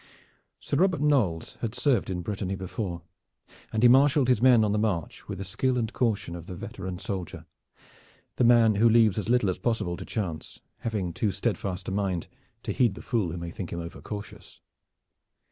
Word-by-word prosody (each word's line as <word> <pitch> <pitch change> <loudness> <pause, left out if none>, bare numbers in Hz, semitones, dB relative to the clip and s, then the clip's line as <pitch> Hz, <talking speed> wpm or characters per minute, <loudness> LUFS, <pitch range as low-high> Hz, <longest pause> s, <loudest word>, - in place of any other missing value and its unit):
Sir 140 - -2
Robert 185 0 +3
Knolles 125 - +1
had 115 0 -3
served 130 -10 +1
in 90 -2 -3
Brittany 95 0 -3
before, 95 -2 -5 0.7
and 110 +1 0
he - - +9
marshaled 135 +1 +5
his 125 -4 +3
men 125 -3 +6
on 105 - +1
the 105 - +1
march 95 -7 -2
with 100 - -5
the 100 - -4
skill 125 +7 -1
and 115 -1 -2
caution 110 -8 0
of 85 -1 -9
the 90 - -6
veteran 90 +1 -6
soldier, 95 -4 -5 0.9
the - - +3
man 115 -2 +6
who 115 +3 +5
leaves 110 -2 +4
as 105 - -4
little 120 -6 +3
as 90 - -7
possible 105 -5 -1
to - - -7
chance, 85 -8 -5 0.2
having 105 -7 -2
too 105 - 0
steadfast 95 -2 -3
a - - -2
mind 95 -3 -1 0.4
to - - -3
heed 115 -6 +2
the - - -10
fool 110 -8 0
who 90 - -5
may 85 0 -5
think 90 0 -6
him 85 - -3
overcautious. 100 +5 -8
105 Hz, 190 wpm, -27 LUFS, 90-120 Hz, 0.9 s, he